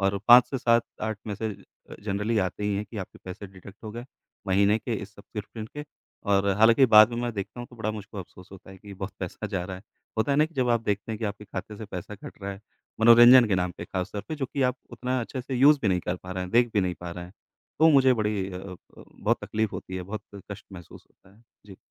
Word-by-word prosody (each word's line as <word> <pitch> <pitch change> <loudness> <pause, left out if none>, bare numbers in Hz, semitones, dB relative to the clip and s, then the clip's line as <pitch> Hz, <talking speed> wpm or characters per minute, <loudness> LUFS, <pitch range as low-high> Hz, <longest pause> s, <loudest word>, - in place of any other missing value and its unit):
और 100 0 +1
5 120 0 +9
से 135 - -2
7-8 115 -3 0
मैसेज 105 0 -5 0.3
अ, - - -8
जनरली 105 +2 -1
आते 95 +1 -2
ही 105 -1 0
हैं 105 - -2
कि 115 - -9
आपके 95 - -8
पैसे 95 +2 -7
डिडक्ट 95 +1 -14
हो 110 - -5
गए, 120 +1 -7 0.4
महीने 100 +3 +3
के 115 - -3
इस 105 0 -7
सब्सक्रिप्शन 110 +1 -8
के 150 - -5 0.5
और 100 0 +3
हालाँकि 115 +4 +6
बाद 110 +2 +9
में - - -3
मैं 120 - -2
देखता 100 +5 -5
हूँ 120 - -7
तो 120 - -15
बड़ा 110 -1 -2
मुझको 105 0 -8
अफसोस 90 0 -11
होता 95 0 -13
है 95 - -12
कि, 100 0 -11
बहुत 95 0 -6
पैसा 95 +3 -5
जा 95 -4 -3
रहा 95 0 -6
है। 95 - -13 0.4
होता 125 +6 +2
है 140 - +1
ना 155 - +6
कि 165 - -21
जब 125 -2 +1
आप 115 -1 +3
देखते 105 +2 -2
हैं 110 - -5
कि 115 - -4
आपके 105 0 -4
खाते 105 +1 -7
से 110 - -7
पैसा 100 +1 -7
कट 105 - -12
रहा 100 - -3
है, 100 - -11 0.4
मनोरंजन 120 +2 +9
के 95 - +2
नाम 90 -1 0
पे - - -5
खास 95 +1 -4
तौर 100 - -4
पे 155 - -3
जो 135 - -2
कि 140 - 0
आप 125 0 +1
उतना 125 +2 -2
अच्छे 130 +3 -5
से 130 0 -5
यूज़ 140 +4 +6
भी 105 - +2
नहीं 90 -2 +1
कर 90 +1 -3
पा 90 +1 -11
रहे 95 0 -3
हैं, 90 - -6
देख 120 0 +4
भी 100 - +4
नहीं 90 -1 -1
पा 90 -1 -6
रहे 85 0 -7
हैं, 90 - -13 0.5
तो 160 - +6
मुझे 135 -3 +6
बड़ी 105 -4 -1
अ 90 - -5
अ, 95 -1 -8 0.2
बहुत - - -2
तकलीफ 110 -1 -1
होती 95 - -6
है, 90 - -4
बहुत 100 +3 -6 0.3
कष्ट 100 0 -8
महसूस 85 -3 -12
होता 95 - -25
है। 115 - -24 0.2
जी। 95 - -12
105 Hz, 265 wpm, -26 LUFS, 95-120 Hz, 0.5 s, 5